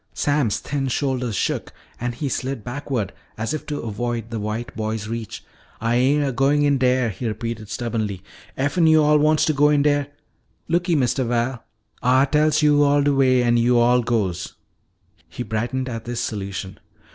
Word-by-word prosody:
Sam's 145 -7 +1
thin 140 -1 -3
shoulders 130 -3 -1
shook - - -2 0.3
and 120 0 -3
he 145 +4 -3
slid 130 -3 -3
backward 125 -5 -3 0.2
as 110 +6 -2
if 155 - -5
to 145 -1 -3
avoid 115 +1 -4
the 115 - -3
white 110 +3 -4
boy's 110 -1 -3
reach. 115 -1 -6 0.3
"Ah 115 +1 -1
ain' 135 +5 +3
a 140 - 0
goin' 140 +3 +2
in 140 -2 +2
dere," 125 -1 +2
he 115 +5 -5
repeated 110 -1 -4
stubbornly. 110 -6 -3 0.3
"Effen 150 +5 +2
yo'all 150 -1 +5
wants 155 +1 +3
to 155 - +1
go 145 +1 +4
in 145 -1 +3
dere 145 -1 +2 0.6
Looky, 175 +1 +1
Mistuh 130 -1 +1
Val, 120 +1 -1 0.4
Ah 130 +3 +4
tells 150 +2 +2
yo'all 145 -1 +4
de 145 0 +2
way 130 -2 +3
an' 120 0 +3
yo'all 120 +1 +4
goes." 100 -7 -2 0.7
He 125 - -5
brightened 120 +4 -2
at 115 -2 -5
this 120 0 -4
solution. 100 -4 -4
125 Hz, 170 wpm, -22 LUFS, 115-145 Hz, 0.7 s, yo'all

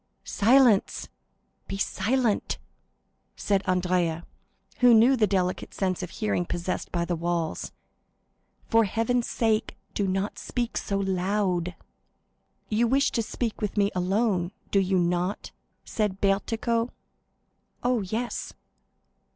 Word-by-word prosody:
"Silence,—be 220 -3 +1
silent!" 230 +2 0 0.8
said 200 -2 +1
Andrea, 180 -2 +1 0.5
who 245 -2 +7
knew 240 +5 +6
the 220 -4 +3
delicate 185 -2 -1
sense 185 -2 -1
of 180 - -5
hearing 210 -2 -1
possessed 175 +1 -3
by 170 -1 0
the 175 - -1
walls; 170 -1 -2 1.0
"for 225 -1 +4
Heaven's 230 +4 0
sake, 220 -1 0 0.2
do 200 - 0
not 190 +2 -2
speak 240 -2 -3
so 200 - -1
loud!" 185 -2 0 0.9
"You 225 +2 +2
wish 275 +3 +2
to 230 - 0
speak 225 0 -3
with 210 0 -3
me 200 0 +3
alone, 185 0 +1 0.2
do 200 - +4
you 190 0 +1
not?" 180 +2 -1 0.3
said 210 -3 -1
Bertuccio. 225 +4 +1 0.9
"Oh, 245 -2 +2
yes." 220 +6 -3
200 Hz, 115 wpm, -26 LUFS, 180-230 Hz, 1.0 s, who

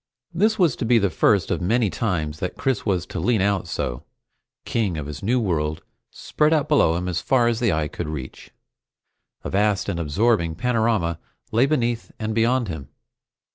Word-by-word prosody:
This 215 +6 +2
was 170 - +3
to - - -3
be 120 +1 +4
the 100 -4 +1
first 95 +3 +2
of - - -1
many 115 +6 +2
such 100 - -4
times 80 -8 -1
that 90 - -4
Chris 130 -5 -1
was 90 -3 0
to 90 - -6
lean 110 +6 +2
out 100 -1 0
so, - - -3 0.6
king 100 -8 -1
of 75 - -4
this 75 0 -7
new 120 +6 +1
world 80 -7 -1 0.3
spread 150 +1 0
out 150 -3 +1
below 115 - +3
him 90 +2 -2
as 90 -2 -1
far 125 -3 +2
as 115 -1 0
the 120 -4 +2
eye 80 -2 0
could 85 +1 -5
reach. 65 -4 -7 0.9
A - - -5
vast 100 0 +1
and 85 -4 -2
absorbing 85 +1 +1
panorama 110 -9 0 0.3
lay 120 +5 +3
beneath 120 -6 -1
and 110 -1 -3
beyond 120 +2 +2
him. 80 -7 -6
100 Hz, 190 wpm, -23 LUFS, 85-120 Hz, 0.9 s, be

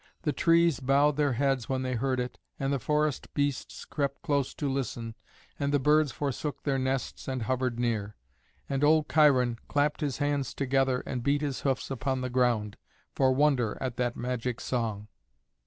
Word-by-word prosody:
The 150 -3 0
trees 170 -2 +3
bowed 140 +2 +3
their 145 -2 +2
heads 135 -1 0
when 130 -1 0
they 130 0 -2
heard 130 +2 0
it, 125 0 -4 0.2
and 135 +1 0
the 140 - 0
forest 150 +2 0
beasts 145 -2 -2
crept 140 -2 -3
close 140 -3 0
to 145 - -2
listen, 125 -4 -3 0.5
and 140 -1 0
the 145 - +4
birds 150 +1 +3
forsook 145 +1 -3
their 135 -2 0
nests 130 0 -2
and 130 -3 -2
hovered 125 +1 -1
near. 110 -4 -1 0.5
And 135 +1 -1
old 155 0 +4
Cheiron 130 -7 +4
clapped 145 +1 +1
his 145 -3 -1
hands 145 -2 -1
together 135 -1 +1
and 125 - -3
beat 140 +3 +1
his 145 -3 -2
hoofs 135 -1 -1
upon 130 0 -1
the 125 -1 -3
ground, 120 -5 +1 0.4
for 130 -1 +3
wonder 130 -5 +2
at 130 -3 -3
that 120 -1 0
magic 125 0 -3
song. 110 -4 -2
135 Hz, 175 wpm, -29 LUFS, 125-145 Hz, 0.5 s, the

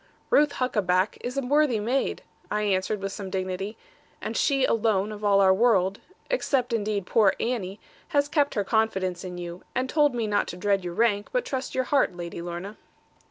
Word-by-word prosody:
'Ruth 295 0 +4
Huckaback 200 -6 0
is 250 +2 -4
a 275 - 0
worthy 280 -3 +2
maid,' 245 +6 -1 0.3
I 210 0 0
answered 195 +1 0
with 195 0 -3
some 195 -1 -6
dignity; 190 +3 -3 0.4
'and - - -5
she 275 -2 +2
alone 215 -3 +1
of 210 0 -8
all 200 -1 +4
our 190 -1 +6
world, 195 -3 +2 0.3
except 270 - 0
indeed 210 -3 -1
poor 205 0 +3
Annie, 215 -5 -2 0.3
has 285 -2 +1
kept 290 -1 +1
her 205 - +1
confidence 190 -4 0
in 180 -1 -6
you, 175 0 -7
and 255 +1 0
told 295 -2 +2
me 230 -2 -1
not 205 -1 +1
to 175 - -6
dread 200 0 +1
your 175 -1 -5
rank, 210 -2 +2
but - - 0
trust 265 -1 -4
your 260 - +2
heart, 260 -8 +1
Lady 170 -1 -6
Lorna.' 175 +4 -6
210 Hz, 190 wpm, -26 LUFS, 190-250 Hz, 0.4 s, our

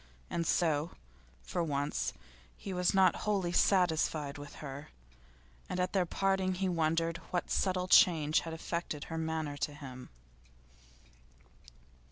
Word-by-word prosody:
And 170 -1 -1
so, 160 -2 +1 0.5
for 115 - -2
once, 145 -2 -1 0.5
he 195 - -6
was 180 +1 +1
not 190 -2 +5
wholly 195 -5 0
satisfied 160 -6 +2
with 145 0 -10
her, 140 0 -8 0.8
and 180 - -2
at 180 0 0
their 185 -3 +2
parting 190 0 +1
he 190 +1 -1
wondered 165 -1 +1
what 175 -2 -2
subtle 185 -1 +1
change 160 -7 +5
had 165 - -6
affected 165 -3 -4
her 165 - -6
manner 160 -2 -2
to 145 0 -3
him. 130 -3 -9
165 Hz, 130 wpm, -32 LUFS, 150-180 Hz, 0.8 s, not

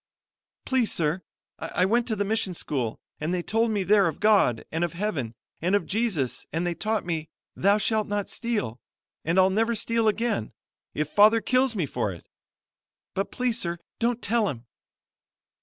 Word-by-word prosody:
"Please, 260 -4 +2
sir, 160 +2 0 0.4
I 170 +3 0
went 235 +4 +2
to 220 - 0
the 205 0 -1
mission 205 -3 0
school, 125 -9 -3 0.2
and 155 +3 -2
they 180 -1 -1
told 225 +4 +1
me 205 -3 0
there 200 -1 +5
of 160 - -3
God 200 - +3
and 165 +2 -1
of 175 - -1
Heaven 165 - -2 0.3
and 180 +4 +2
of 205 - +1
Jesus 195 - -1
and 165 +3 -1
they 175 - 0
taught 215 +5 -1
me, 160 -2 -3 0.3
'Thou 200 +2 +4
shalt 215 0 +1
not 205 -1 -1
steal,' 210 - -3 0.4
and 165 +4 0
I'll 190 0 +5
never 225 +4 +1
steal 230 +1 +1
again, 215 - 0 0.4
if 150 0 0
father 215 +5 +6
kills 255 +1 +2
me 180 -6 0
for 120 -6 -2
it. 85 - -11 0.9
But, 195 +1 -2
please 250 -2 0
sir, 170 -1 -2 0.2
don't 240 +1 0
tell 220 -1 +2
him." 120 -3 -7
200 Hz, 175 wpm, -26 LUFS, 165-225 Hz, 0.9 s, father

